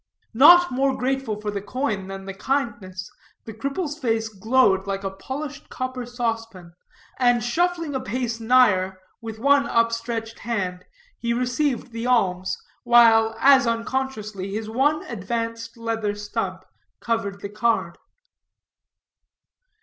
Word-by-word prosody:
Not 345 +8 +7
more 270 +1 +1
grateful 260 -4 -1
for 210 0 -3
the 200 -1 -4
coin 210 -3 -3
than 195 0 -7
the 195 - -6
kindness, 195 -6 -3 0.4
the 220 - -7
cripple's 285 - -4
face 225 -5 0
glowed 205 -2 +2
like 195 0 -3
a 195 - -2
polished 275 +9 -7
copper 255 -1 -4
saucepan, 225 -7 -4 0.5
and 245 -2 +3
shuffling 335 +4 0
a 265 - -1
pace 240 -1 -3
nigher, 215 -6 +3 0.2
with 225 -1 -7
one 280 +4 +3
upstretched 230 -1 -1
hand 190 -6 -3 0.3
he 235 0 -1
received 250 +1 -1
the 230 +1 -4
alms, 190 -7 +1 0.3
while, 225 -2 +5
as 275 -2 +6
unconsciously, 230 -5 -3
his 215 +1 -4
one 275 +7 +1
advanced 230 +2 -4
leather 225 -2 -2
stump 205 -3 -4 0.3
covered 200 -3 -2
the 200 - -5
card. 225 +2 0
230 Hz, 125 wpm, -23 LUFS, 205-255 Hz, 0.5 s, Not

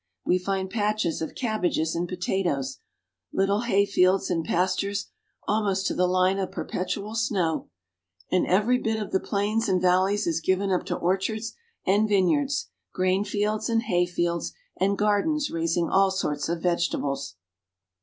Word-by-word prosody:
We 180 - +3
find 190 +1 -2
patches 210 -5 -1
of 160 - -4
cabbages 180 -9 0
and 170 +1 -2
potatoes, 175 -8 -1 0.5
little 200 +2 +1
hay 200 -4 +3
fields 185 -1 +2
and 165 -2 0
pastures 190 +4 -1 0.4
almost 200 -2 +1
to - - +1
the 180 - +2
line 185 +1 +2
of 190 - -2
perpetual 200 +3 -3
snow, 185 - 0 0.6
and 185 - +2
every 215 +7 +3
bit 220 -2 -1
of 210 - -5
the 190 - +2
plains 210 +3 0
and 185 -1 +3
valleys 185 +3 +2
is 165 -1 0
given 190 +3 +1
up 180 - 0
to - - -1
orchards 195 +5 -1 0.3
and 205 +3 +3
vineyards, 265 +9 +2 0.2
grain 185 +1 +1
fields 210 +2 -1
and 225 0 +2
hay 175 -3 +1
fields, 170 -1 -1 0.2
and 200 +1 +1
gardens 210 +9 +1
raising 165 +1 0
all 195 0 +4
sorts 155 -6 -2
of 170 -1 -2
vegetables. 140 - -1
190 Hz, 155 wpm, -26 LUFS, 175-210 Hz, 0.6 s, all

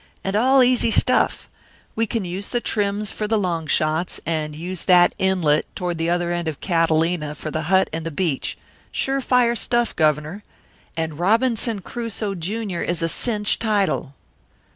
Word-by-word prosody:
And 195 +1 -2
all 260 +4 +5
easy 245 -2 +3
stuff. - - +2 0.5
We 225 0 0
can 215 -1 -2
use 185 +3 -5
the 240 - 0
trims 205 -2 -1
for 210 - -3
the 220 +1 +2
long 170 -5 -1
shots, 155 +4 0
and 155 -2 -2
use 175 +3 -6
that 175 -1 +5
inlet, 180 -6 +2
toward 175 -2 -3
the 165 +1 0
other 175 0 0
end 175 -1 -2
of 155 -3 -4
Catalina 165 -2 +1
for 155 - -6
the 155 - -2
hut 190 0 +4
and 160 0 -3
the 165 - -3
beach; 160 -3 -2 0.3
sure 270 0 -1
fire 245 -2 +3
stuff, 240 0 0
Governor 155 +5 0 0.5
and 160 -2 -3
Robinson 225 +2 +1
Crusoe, 225 -2 -4
Junior 195 +1 -3
is 170 -1 -2
a - - +2
cinch 210 +1 -1
title." 200 - 0
185 Hz, 165 wpm, -22 LUFS, 165-220 Hz, 0.5 s, all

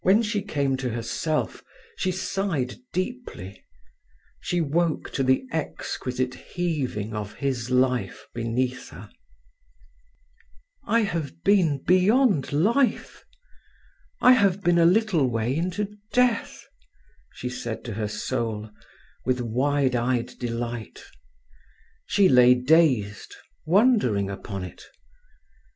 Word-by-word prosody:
When 205 +5 +4
she 210 -2 -1
came 140 -9 -1
to 130 -1 -3
herself 120 +7 -2 0.3
she 185 - -1
sighed 180 -8 -2
deeply. 185 - -5 0.8
She 175 - -1
woke 165 +1 0
to - - -2
the 130 - +2
exquisite 130 -4 -3
heaving 135 - -3
of 105 -1 -5
his 130 -4 -2
life 125 -6 0
beneath 120 +2 -2
her. - - -12 1.7
"I 230 +1 +3
have 165 -7 -3
been 175 -9 +3
beyond 190 - +3
life. 225 - +1 1.0
I 250 - +7
have 200 -5 +3
been 175 -1 +3
a 165 - +5
little 185 - +3
way 115 +2 -1
into 185 +5 -2 0.2
death!" 250 -2 +1 0.7
she 125 - -4
said 120 -3 -5
to 115 - -5
her 105 +1 -2
soul, 110 0 -3 0.5
with 130 -1 0
wide 130 +3 +1
eyed 120 0 0
delight. 120 -2 -5 1.0
She 200 -2 +4
lay 125 -2 +6
dazed, 125 -7 +2 0.3
wondering 170 - +3
upon 95 0 -6
it. 90 - -9
135 Hz, 110 wpm, -25 LUFS, 120-185 Hz, 1.7 s, I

